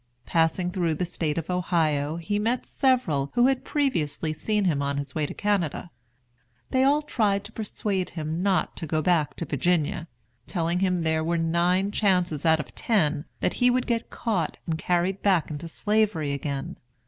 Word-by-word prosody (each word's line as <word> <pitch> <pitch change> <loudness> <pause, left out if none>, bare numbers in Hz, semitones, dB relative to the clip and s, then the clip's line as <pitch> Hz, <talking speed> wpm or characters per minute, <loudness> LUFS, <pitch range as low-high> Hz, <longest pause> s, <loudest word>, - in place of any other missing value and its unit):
Passing 165 +2 +1
through 175 -4 0
the 180 - -1
State 160 -3 -2
of 165 +2 -3
Ohio, 160 -4 +1
he 205 +5 -2
met 235 +4 0
several 205 - +1
who 240 0 +5
had 265 -1 +2
previously 160 - 0
seen 210 +5 0
him 150 -6 +1
on 140 0 -1
his 140 -2 -4
way 150 -2 -1
to - - -6
Canada. 180 -5 -1 0.8
They 260 0 +3
all 290 +3 +3
tried 205 -8 +1
to 205 - -10
persuade 205 -4 -2
him 160 0 -4
not 195 -1 +1
to 160 - -5
go 155 +1 0
back 155 -6 +2
to 170 - -4
Virginia; 165 +4 0 0.4
telling 170 -1 0
him 185 -1 +2
there 160 -1 0
were 170 +1 0
nine 175 +4 +1
chances 180 -7 +1
out 160 0 +5
of 150 - -6
ten 155 -9 +1 0.2
that - - +1
he 245 - +6
would 250 0 +1
get 230 -2 -1
caught 195 -9 -2
and 165 - -1
carried 180 +3 0
back 185 -7 +2
into 150 +2 -5
Slavery 205 -5 0
again. 140 -1 -4
175 Hz, 180 wpm, -26 LUFS, 155-205 Hz, 0.8 s, he